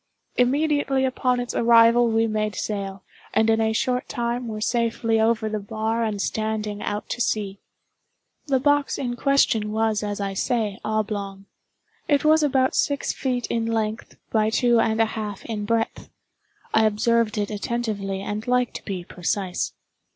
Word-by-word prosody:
Immediately 275 +1 +2
upon 255 -1 0
its 245 0 -3
arrival 235 +1 +5
we 225 0 +2
made 215 -1 -1
sail, 195 -2 -4 0.3
and 220 +1 +4
in 225 0 +2
a 220 0 +2
short 250 +3 -1
time 240 0 -2
were 215 -1 -4
safely 230 0 +1
over 220 0 +2
the 215 0 -2
bar 220 +3 -2
and 215 -2 -2
standing 215 0 -2
out 205 0 -3
to 245 - -3
sea. 200 -3 -1 0.9
The 270 -2 +2
box 290 +1 +2
in 245 -3 -2
question 240 -6 +2
was, 220 -1 +1
as 205 -1 -3
I 200 -1 -2
say, 215 -1 -1
oblong. 205 -2 -3 0.6
It 290 0 +2
was 315 +1 +5
about 265 -3 +2
six 285 -1 0
feet 250 -2 -2
in 230 -1 -1
length 220 -1 -2
by 215 -1 +2
two 240 +1 +3
and 220 0 +1
a 225 - +5
half 215 -3 -5
in 215 -3 -4
breadth; 225 +1 -1 0.6
I 220 0 +5
observed 225 +1 +1
it 205 0 -1
attentively, 205 -3 -3
and 210 +3 -4
like 250 0 +1
to - - -7
be 190 -3 -4
precise. 180 +1 -2
225 Hz, 160 wpm, -24 LUFS, 210-240 Hz, 0.9 s, arrival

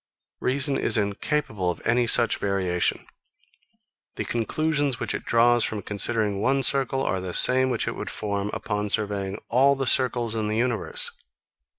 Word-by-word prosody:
Reason 140 +2 +1
is - - +5
incapable 105 -1 -2
of 90 - -4
any 120 0 +2
such 120 0 +4
variation. 95 -3 -1 1.1
The - - -4
conclusions 145 +3 -1
which - - -3
it - - -5
draws 120 0 +3
from 105 -3 -3
considering 105 0 -1
one 135 +3 +1
circle 135 -1 +2
are 95 -7 -1
the 90 -1 -5
same 130 +1 +4
which 120 -3 -1
it - - -3
would - - -6
form 100 -1 -3
upon 105 -2 -3
surveying 100 -2 -2
all 135 +4 +4
the 135 0 -3
circles 120 -2 +1
in 110 -2 -2
the 105 +1 -2
universe. 120 -3 -1
115 Hz, 160 wpm, -24 LUFS, 100-130 Hz, 1.1 s, is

